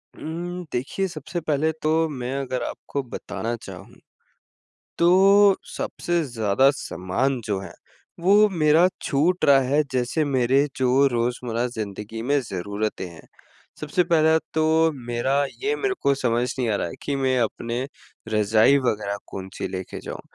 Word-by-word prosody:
हुँ, 175 +2 -5
देखिए 135 +10 -2
सबसे 170 +1 -5
पहले 155 0 +1
तो 160 +1 +2
मैं 130 -2 -4
अगर 130 -2 -3
आपको 140 - -4
बताना 120 -1 -5
चाहूँ। - - -11 1.0
तो 195 +3 +6 0.2
सबसे 175 -1 -1
ज़्यादा 115 0 +2
सामान 130 +10 -2
जो 100 -2 -1
है 95 -3 -8 0.5
वो 205 +4 +5
मेरा 165 0 +4
छूट 165 +6 +1
रहा 140 -1 +6
है 140 +4 +2
जैसे 130 +5 0
मेरे 135 +1 +2
जो 130 +2 +3
रोज़मर्रा 120 0 -1
ज़िंदगी 110 -1 -6
में 140 +4 +1
ज़रूरतें 100 +1 -3
हैं। 85 -2 -14 0.5
सबसे 155 +4 +1
पहला 160 -2 +4 0.2
तो 155 0 +2 0.4
मेरा 130 +4 +1 0.2
ये 435 +1 +1
मेरे 400 -2 -1
को 140 - +3
समझ 120 -1 0
नहीं 120 -3 0
आ 105 - +1
रहा 85 - -1
है - - -8
कि 140 - -1
मैं 130 -1 +1
अपने 120 +3 -2 0.4
रज़ाई 110 +5 +4
वग़ैरह 105 -5 -1
कौन-सी 95 -1 -6
ले 95 0 -4
के - - -9
जाऊँ। - - -7
130 Hz, 145 wpm, -24 LUFS, 115-160 Hz, 1.0 s, तो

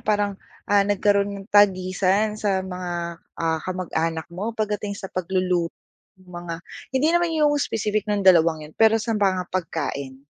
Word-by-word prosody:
parang 205 -2 0 0.2
ah, 205 0 +4
nagkaroon 200 0 +1
ng - - -22
tagisan 195 +1 +3
sa 200 -3 -1
mga, 175 -2 -5 0.2
ah, 160 -1 0
kamag-anak 165 -3 -2
mo 210 +6 -4
pagdating 210 -1 -2
sa 200 - -10
pagluluto 185 -1 0 0.5
ng 185 - -22
mga, 175 -1 -5 0.4
hindi 290 +4 +3
naman 345 -1 +2
yung 300 -1 +4
specific 215 -3 -1
ng 205 -2 0
dalawang 165 -4 +5
yun 150 - -13
pero 225 +3 +4
sa 225 +1 -2
mga 190 -4 0
pagkain? 140 -6 -3
190 Hz, 150 wpm, -23 LUFS, 175-205 Hz, 0.5 s, dalawang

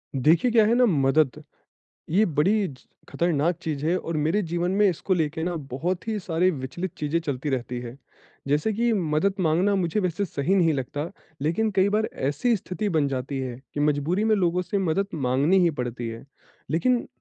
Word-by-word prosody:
देखिए 160 - +3
क्या 225 -2 +5
है 225 - +3
ना 250 - +5
मदद, 150 - +2 0.7
ये 195 +7 +4
बड़ी 190 +7 +2
ज 130 - -12 0.3
खतरनाक 170 0 +1
चीज़ 150 -3 -3
है 175 - +2
और 165 -1 -4
मेरे 160 +7 +1
जीवन 175 0 -1
में 205 0 +5
इसको 185 +2 0
लेके 160 -1 -1
ना 175 0 -2 0.2
बहुत 175 - -2
ही 215 -1 -1
सारी 180 0 +1
विचलित 155 +4 -5
चीज़ें 150 +2 0
चलती 145 -3 -3
रहती 125 -1 -2
है। 120 +1 -8 0.5
जैसे 150 +10 +1
कि 235 +3 +1
मदद 185 0 +1
माँगना 180 +4 +2
मुझे 185 +1 0
वैसे 185 +1 -1
सही 160 +1 -1
नहीं 170 -4 +4
लगता, 145 +3 -3 0.4
लेकिन 195 +9 +1
कई 190 +1 +4
बार 215 +2 +1
ऐसी 145 - 0
स्थिति 200 +2 -4
बन 155 -6 +2
जाती 135 +1 -3
है 125 -2 -4 0.2
कि 145 - -2
मजबूरी 150 +7 +1
में 220 0 +4
लोगों 180 -2 +1
से 200 +3 -2
मदद 195 +1 0
माँगनी 140 +5 +2
ही 170 - +4
पड़ती 120 -4 -4
है, 115 0 -8 0.5
लेकिन 240 - +1
165 Hz, 190 wpm, -25 LUFS, 145-195 Hz, 0.7 s, क्या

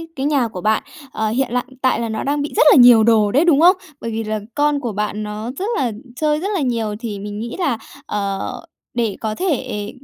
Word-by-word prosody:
cái 270 0 -3
nhà 280 -5 +2
của 185 -5 -8
bạn, 215 0 +1 0.3
ờ, 220 0 -1
hiện 255 +3 0
lại 250 0 0 0.2
tại 260 -2 +2
là 230 -1 -2
nó 220 - -3
đang 285 +1 0
bị 290 - -4
rất - - +4
là - - +7
nhiều 245 -3 +8
đồ 215 -3 +4
đấy, 290 +7 +3
đúng 315 -3 +4
không? 360 +3 +7 0.3
Bởi 230 - -4
vì 225 0 -2
là 215 0 -2 0.2
con 290 0 +2
của 240 -5 -3
bạn 210 +1 -3
nó 210 +3 -5
rất 390 - -2
là 245 -4 0 0.2
chơi 300 +1 +1
rất 395 +4 -3
là 365 - 0
nhiều 230 -5 -1
thì 215 -4 -5
mình 205 +1 -6
nghĩ 235 +1 -5
là, 280 -10 0 0.3
ờ, 200 -1 -2 0.5
để 230 -4 -1
có 215 -1 -2
thể 255 - -2
235 Hz, 240 wpm, -19 LUFS, 215-280 Hz, 0.5 s, nhiều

